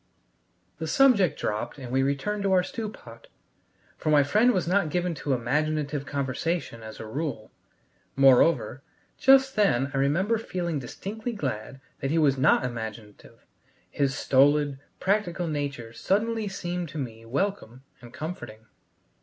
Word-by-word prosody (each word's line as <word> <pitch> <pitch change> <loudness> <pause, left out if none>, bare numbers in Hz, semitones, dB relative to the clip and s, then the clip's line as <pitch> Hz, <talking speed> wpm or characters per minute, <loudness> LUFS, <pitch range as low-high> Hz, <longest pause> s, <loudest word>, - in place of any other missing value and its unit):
The 160 - -3
subject 200 - +4
dropped 105 +6 -3
and 130 -3 -8
we 135 +1 +2
returned 140 +10 -1
to 195 -1 0
our 180 -1 +4
stew 220 +3 -5
pot, 115 - -14 0.7
for - - -2
my 150 -2 +5
friend 215 - +4
was 185 -7 -1
not 185 -2 +2
given 175 +2 -1
to 145 -2 -2
imaginative 145 +3 -1
conversation 140 -1 -2
as 110 0 -10
a - - -6
rule. 130 -2 -4 0.6
Moreover, 135 +4 +4 0.4
just 270 0 +5
then 135 - +2
I - - -1
remember 180 +12 +1
feeling 175 -7 -3
distinctly 215 - -6
glad 135 - -4 0.2
that 135 - -2
he 160 - +1
was 145 -4 +4
not 130 0 +3
imaginative; 110 -3 -8 0.5
his 135 -1 0
stolid, 140 +1 +3 0.2
practical 190 -3 0
nature 140 -6 -4
suddenly 215 - 0
seemed 175 -3 -4
to 150 - -8
me 115 -5 -6
welcome 130 - -3 0.2
and 120 -1 -12
comforting. 150 - -7
145 Hz, 145 wpm, -26 LUFS, 130-185 Hz, 0.7 s, my